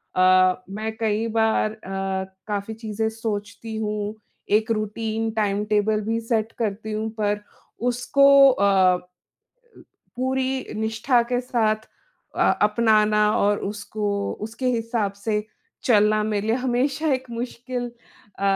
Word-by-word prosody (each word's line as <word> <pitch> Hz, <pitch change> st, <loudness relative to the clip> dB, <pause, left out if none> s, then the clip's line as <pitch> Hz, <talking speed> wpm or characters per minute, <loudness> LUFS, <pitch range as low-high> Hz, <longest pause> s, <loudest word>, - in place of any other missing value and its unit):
अ, 185 Hz, 0 st, +4 dB
मैं 215 Hz, +2 st, -4 dB
कई 220 Hz, 0 st, 0 dB
बार 220 Hz, -1 st, +2 dB
अ, 195 Hz, -2 st, -4 dB, 0.2 s
काफ़ी 205 Hz, +1 st, -3 dB
चीज़ें 220 Hz, 0 st, -3 dB
सोचती 210 Hz, 0 st, -4 dB
हूँ, 210 Hz, -1 st, -2 dB, 0.4 s
एक 220 Hz, +1 st, -4 dB
रूटीन 220 Hz, +1 st, -2 dB
टाइम 210 Hz, -2 st, 0 dB
टेबल 210 Hz, +1 st, +2 dB
भी 225 Hz, +2 st, -1 dB
सेट 225 Hz, -1 st, -1 dB
करती 220 Hz, -1 st, -2 dB
हूँ 215 Hz, +1 st, -2 dB
पर, 205 Hz, 0 st, +1 dB, 0.5 s
उसको 245 Hz, +3 st, +2 dB, 0.3 s
अ, 190 Hz, -5 st, +4 dB, 1.2 s
पूरी 260 Hz, +1 st, -1 dB
निष्ठा 220 Hz, +3 st, +1 dB
के 245 Hz, -, +2 dB
साथ 220 Hz, -3 st, 0 dB, 0.5 s
अ, -, -, -1 dB, 0.2 s
अपनाना 210 Hz, -1 st, +3 dB
और 205 Hz, 0 st, +2 dB
उसको 205 Hz, -1 st, -3 dB, 0.2 s
उसके 230 Hz, +4 st, -6 dB
हिसाब 225 Hz, -3 st, -1 dB
से 210 Hz, -1 st, 0 dB, 0.4 s
चलना 215 Hz, -2 st, +4 dB
मेरे 210 Hz, -1 st, -1 dB
लिए 225 Hz, -, +2 dB
हमेशा 265 Hz, +5 st, 0 dB
एक 260 Hz, -1 st, -4 dB
मुश्किल 245 Hz, +1 st, -4 dB
अ, 235 Hz, -4 st, -21 dB
220 Hz, 125 wpm, -23 LUFS, 210-230 Hz, 1.2 s, अ